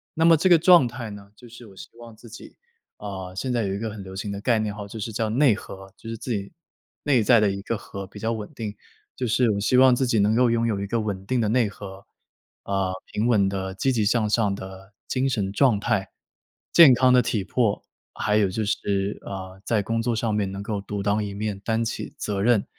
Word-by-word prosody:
那 160 Hz, +1 st, +2 dB
么 165 Hz, -1 st, +7 dB
这 185 Hz, +4 st, +2 dB
个 170 Hz, -, +8 dB
状 170 Hz, -5 st, +6 dB
态 120 Hz, -2 st, -7 dB
呢 100 Hz, 0 st, -12 dB
就 120 Hz, -, -15 dB
是 120 Hz, 0 st, -13 dB
我 95 Hz, -, -16 dB
希 -, -, -11 dB
望 115 Hz, -2 st, -12 dB
自 115 Hz, +2 st, -15 dB
己， 115 Hz, -, -12 dB, 0.4 s
啊， 95 Hz, -3 st, -7 dB
现 125 Hz, +5 st, -2 dB
在 115 Hz, -2 st, 0 dB
有 95 Hz, -, -2 dB
一 -, -, -3 dB
个 110 Hz, 0 st, -3 dB
很 100 Hz, -2 st, -8 dB
流 95 Hz, 0 st, -10 dB
行 100 Hz, +1 st, -4 dB
的 100 Hz, 0 st, -5 dB
概 115 Hz, -2 st, +2 dB
念 105 Hz, -1 st, -2 dB
哈， 105 Hz, -1 st, -7 dB
就 110 Hz, +2 st, -8 dB
是 110 Hz, +1 st, -5 dB
叫 110 Hz, 0 st, -1 dB
内 125 Hz, +1 st, +4 dB
核， 95 Hz, -1 st, -11 dB
就 115 Hz, -, -11 dB
是 115 Hz, -, -5 dB
自 125 Hz, -, -6 dB
己 100 Hz, -2 st, -3 dB, 0.5 s
内 135 Hz, -5 st, +3 dB
在 120 Hz, +1 st, +5 dB
的 105 Hz, -2 st, +3 dB
一 100 Hz, 0 st, -5 dB
个 115 Hz, +2 st, -3 dB
核 100 Hz, -1 st, -8 dB
比 105 Hz, -, -12 dB
较 115 Hz, +2 st, -1 dB
稳 110 Hz, +4 st, -5 dB
定， 110 Hz, -4 st, -6 dB, 0.4 s
就 125 Hz, -, -2 dB
是 120 Hz, 0 st, +2 dB
我 100 Hz, -, -1 dB
希 125 Hz, +5 st, +2 dB
望 130 Hz, -1 st, +6 dB
自 130 Hz, -, 0 dB
己 115 Hz, -, +1 dB
能 105 Hz, +2 st, +3 dB
够 125 Hz, 0 st, +4 dB
拥 115 Hz, 0 st, +1 dB
有 105 Hz, -3 st, -1 dB
一 100 Hz, -, -3 dB
个 115 Hz, +2 st, -1 dB
稳 100 Hz, -3 st, -3 dB
定 125 Hz, +3 st, 0 dB
的 110 Hz, -, +1 dB
内 115 Hz, -3 st, +2 dB
核， 100 Hz, -1 st, -10 dB, 0.6 s
呃， 95 Hz, -1 st, -1 dB, 0.2 s
平 110 Hz, +3 st, 0 dB
稳 105 Hz, -5 st, +3 dB
的 95 Hz, -1 st, -3 dB
积 135 Hz, +7 st, +1 dB
极 115 Hz, -4 st, +1 dB
向 110 Hz, +1 st, +2 dB
上 105 Hz, -2 st, +1 dB
的 95 Hz, +1 st, -10 dB, 0.2 s
精 135 Hz, +1 st, 0 dB
神 100 Hz, -6 st, -1 dB
状 120 Hz, -3 st, +3 dB
态， 105 Hz, -4 st, -1 dB, 0.6 s
健 150 Hz, -7 st, +9 dB
康 130 Hz, 0 st, +4 dB
的 125 Hz, -, +6 dB
体 110 Hz, -4 st, -1 dB
魄， 110 Hz, +1 st, 0 dB, 0.3 s
还 105 Hz, 0 st, +1 dB
有 100 Hz, -3 st, +3 dB
就 110 Hz, +3 st, -2 dB
是， 100 Hz, -1 st, -1 dB
呃， 95 Hz, 0 st, -8 dB
在 105 Hz, 0 st, 0 dB
工 115 Hz, +2 st, -1 dB
作 120 Hz, -1 st, -1 dB
上 110 Hz, -1 st, -1 dB
面 100 Hz, -2 st, -1 dB
能 100 Hz, +1 st, -6 dB
够 105 Hz, -2 st, -3 dB
独 100 Hz, 0 st, -5 dB
当 105 Hz, +1 st, +1 dB
一 100 Hz, -1 st, -6 dB
面， 105 Hz, -1 st, -3 dB
担 115 Hz, +2 st, -1 dB
起 115 Hz, -, -5 dB
责 100 Hz, -2 st, -3 dB
任， 115 Hz, -2 st, +3 dB
105 Hz, 270 characters per minute, -24 LUFS, 100-120 Hz, 0.6 s, 健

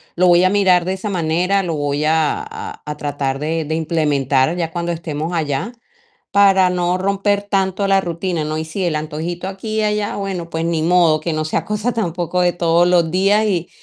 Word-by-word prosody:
lo 180 Hz, +1 st, +3 dB
voy 175 Hz, +1 st, +5 dB
a -, -, +4 dB
mirar 185 Hz, -3 st, +3 dB
de 185 Hz, -, -1 dB
esa 190 Hz, +2 st, -4 dB
manera, 180 Hz, +2 st, +1 dB
lo 170 Hz, -3 st, -2 dB
voy 145 Hz, 0 st, -1 dB
a 160 Hz, -, +1 dB
a 440 Hz, 0 st, -8 dB
a 150 Hz, 0 st, -5 dB
tratar 140 Hz, -2 st, -3 dB
de 160 Hz, +2 st, -2 dB
de 155 Hz, +2 st, -2 dB
implementar, 150 Hz, -3 st, +1 dB
ya 165 Hz, -2 st, -2 dB
cuando 170 Hz, 0 st, -2 dB
estemos 160 Hz, 0 st, -4 dB
allá, 155 Hz, -, -2 dB, 0.6 s
para 195 Hz, -2 st, +5 dB
no 180 Hz, 0 st, 0 dB
romper 200 Hz, +1 st, 0 dB
tanto 195 Hz, -1 st, 0 dB
la 195 Hz, 0 st, +3 dB
rutina, 170 Hz, -2 st, -3 dB
¿no? 155 Hz, 0 st, -3 dB
Y 160 Hz, -, -3 dB
sí, 160 Hz, +5 st, -5 dB
el 170 Hz, -3 st, 0 dB
antojito, 160 Hz, +4 st, -4 dB
aquí 195 Hz, +3 st, -5 dB
y -, -, +2 dB
allá, 210 Hz, -1 st, -1 dB
bueno, 190 Hz, -4 st, -4 dB
pues 160 Hz, 0 st, -2 dB
ni 165 Hz, -1 st, 0 dB
modo, 165 Hz, -2 st, +3 dB
que 165 Hz, +2 st, -3 dB
no 155 Hz, 0 st, -1 dB
sea 155 Hz, +1 st, -2 dB
cosa, 210 Hz, +5 st, -2 dB
tampoco, 180 Hz, -4 st, -2 dB
de 175 Hz, 0 st, +3 dB
todos 170 Hz, 0 st, +3 dB
los 175 Hz, -2 st, +3 dB
días 200 Hz, +4 st, +3 dB
y, 180 Hz, -5 st, -1 dB
175 Hz, 210 wpm, -18 LUFS, 160-195 Hz, 0.6 s, voy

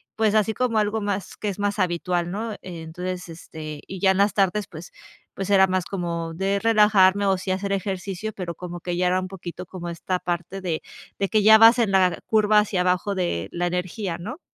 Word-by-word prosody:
pues, 220 Hz, -1 st, +2 dB
así 215 Hz, +1 st, +2 dB
como 245 Hz, -1 st, 0 dB
algo 215 Hz, +1 st, +1 dB
más 200 Hz, -2 st, -3 dB
que 210 Hz, -, -3 dB
es 195 Hz, -, -5 dB
más 205 Hz, +1 st, -1 dB
habitual, 175 Hz, -1 st, 0 dB
¿no?, 215 Hz, +4 st, -4 dB
eh, -, -, -9 dB
entonces, 180 Hz, +1 st, -6 dB
este, 155 Hz, -2 st, -9 dB
y 190 Hz, -1 st, -7 dB
ya 190 Hz, 0 st, +4 dB
en 190 Hz, -, 0 dB
las 200 Hz, +1 st, +3 dB
tardes, 200 Hz, 0 st, +1 dB
pues 165 Hz, +1 st, -11 dB, 0.4 s
pues, 195 Hz, 0 st, -4 dB
era 190 Hz, -1 st, +6 dB
más 185 Hz, -1 st, -1 dB
como 170 Hz, -3 st, -4 dB
de 195 Hz, +3 st, 0 dB
relajarme 205 Hz, -3 st, +4 dB
o 195 Hz, -1 st, +2 dB
sí 185 Hz, -, -6 dB
hacer 195 Hz, +1 st, -2 dB
ejercicio, 195 Hz, +1 st, -3 dB
pero 175 Hz, -4 st, -5 dB
como 175 Hz, -1 st, -7 dB
que 175 Hz, -1 st, -3 dB
ya 180 Hz, 0 st, +2 dB
era 185 Hz, +1 st, +1 dB
un 185 Hz, -, -6 dB
poquito 180 Hz, -1 st, -8 dB
como 175 Hz, -1 st, -8 dB
esta 180 Hz, +2 st, -3 dB
parte 175 Hz, +2 st, -4 dB
de 170 Hz, -4 st, -2 dB, 0.4 s
de 195 Hz, -1 st, -1 dB
que 215 Hz, -, +3 dB
ya 220 Hz, +1 st, +9 dB
vas 225 Hz, +2 st, +7 dB
en 225 Hz, -4 st, +2 dB
la 185 Hz, -2 st, +3 dB
curva 215 Hz, -1 st, +4 dB
hacia 200 Hz, -3 st, 0 dB
abajo 185 Hz, +2 st, 0 dB
de 175 Hz, -, -1 dB
la 175 Hz, 0 st, -1 dB
energía, 180 Hz, 0 st, -3 dB
¿no? 225 Hz, -, -7 dB
190 Hz, 220 wpm, -24 LUFS, 175-205 Hz, 0.4 s, ya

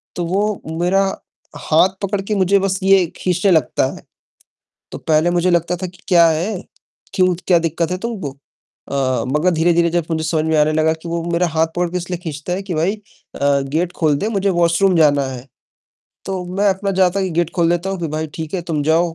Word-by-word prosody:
तो 175 Hz, -, -2 dB
वो 200 Hz, +4 st, -1 dB, 0.2 s
मेरा 190 Hz, +3 st, +3 dB, 0.7 s
हाथ 160 Hz, +4 st, +5 dB
पकड़ 200 Hz, 0 st, -1 dB
के 210 Hz, +2 st, -3 dB
मुझे 195 Hz, 0 st, +3 dB
बस 190 Hz, 0 st, -1 dB
ये 190 Hz, -1 st, +5 dB
खींचने 185 Hz, +2 st, +1 dB
लगता 160 Hz, -3 st, +2 dB
है। -, -, -13 dB, 0.9 s
तो -, -, -6 dB
पहले 160 Hz, +2 st, +2 dB
मुझे 175 Hz, +1 st, +1 dB
लगता 170 Hz, +1 st, +1 dB
था 185 Hz, +1 st, -4 dB
कि 180 Hz, 0 st, -15 dB
क्या 170 Hz, -2 st, +6 dB
है, 175 Hz, +5 st, -1 dB, 0.5 s
क्यों 185 Hz, -1 st, +3 dB
क्या 180 Hz, -, +5 dB
दिक्कत 165 Hz, +1 st, -1 dB
है 180 Hz, -, -1 dB
तुमको, 200 Hz, -, -4 dB
अ, 135 Hz, -3 st, -4 dB
मगर 150 Hz, +7 st, +1 dB
धीरे-धीरे 170 Hz, +1 st, +2 dB
जब 170 Hz, -1 st, -1 dB
मुझे 160 Hz, -1 st, -1 dB
समझ 155 Hz, 0 st, 0 dB
में 160 Hz, -1 st, +1 dB
आने 150 Hz, 0 st, +3 dB
लगा 155 Hz, +1 st, +2 dB
कि 160 Hz, +1 st, -9 dB
वो 170 Hz, 0 st, -2 dB
मेरा 175 Hz, +1 st, +2 dB
हाथ 160 Hz, 0 st, +1 dB
पकड़ 175 Hz, 0 st, 0 dB
के 180 Hz, -, -1 dB
इसलिए 180 Hz, 0 st, -4 dB
खींचता 155 Hz, +1 st, -4 dB
है 185 Hz, -, -2 dB
कि 190 Hz, -2 st, -5 dB
भाई 170 Hz, +7 st, +1 dB
अ, 140 Hz, -8 st, -2 dB, 0.2 s
गेट 175 Hz, +2 st, 0 dB
खोल 155 Hz, -3 st, +2 dB
दे, 205 Hz, -, -2 dB
मुझे 200 Hz, -2 st, 0 dB
वॉशरूम 175 Hz, +2 st, +2 dB
जाना 145 Hz, -3 st, +4 dB
है। 130 Hz, 0 st, -8 dB, 0.8 s
तो 190 Hz, -2 st, -4 dB
मैं 205 Hz, +1 st, +3 dB
अपना 195 Hz, +1 st, 0 dB
जाता 185 Hz, +1 st, +3 dB
कि 190 Hz, -, -2 dB
गेट 170 Hz, 0 st, 0 dB
खोल 170 Hz, -2 st, +3 dB
देता 175 Hz, +2 st, -1 dB
हूँ 195 Hz, -, -3 dB
कि 165 Hz, -, -1 dB
भाई 155 Hz, +1 st, -3 dB
ठीक 160 Hz, 0 st, -6 dB
है, 185 Hz, -, -1 dB
तुम 160 Hz, -4 st, -2 dB
जाओ। 165 Hz, +2 st, +1 dB
175 Hz, 215 wpm, -18 LUFS, 160-185 Hz, 0.9 s, क्या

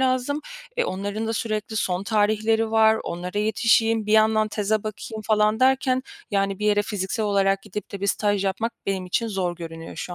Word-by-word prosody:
lazım. 260 Hz, +3 st, +1 dB, 0.4 s
E, -, -, +2 dB
onların 205 Hz, +4 st, -3 dB
da 225 Hz, -, -1 dB
sürekli 215 Hz, -1 st, -3 dB
son 185 Hz, -2 st, 0 dB
tarihleri 220 Hz, +1 st, +2 dB
var, 220 Hz, 0 st, +5 dB
onlara 180 Hz, +4 st, -4 dB
yetişeyim, 220 Hz, +1 st, +2 dB
bir 210 Hz, -, 0 dB
yandan 215 Hz, 0 st, +4 dB
teze 210 Hz, 0 st, 0 dB
bakayım 215 Hz, +1 st, -6 dB
falan 215 Hz, +1 st, +2 dB
derken, 260 Hz, 0 st, +3 dB, 0.3 s
yani 195 Hz, -1 st, 0 dB
bir 210 Hz, -, -1 dB
yere 205 Hz, 0 st, +3 dB
fiziksel 205 Hz, +1 st, -2 dB
olarak 195 Hz, -1 st, +2 dB
gidip 210 Hz, 0 st, -7 dB
de 200 Hz, -, -6 dB
bir 200 Hz, -, -1 dB
staj 205 Hz, 0 st, +1 dB
yapmak 220 Hz, +5 st, -1 dB
benim 190 Hz, -2 st, -1 dB
için 230 Hz, +5 st, 0 dB
zor 180 Hz, -4 st, -2 dB
görünüyor 165 Hz, -1 st, -8 dB
şu 175 Hz, -, -5 dB
210 Hz, 185 wpm, -24 LUFS, 195-220 Hz, 0.4 s, var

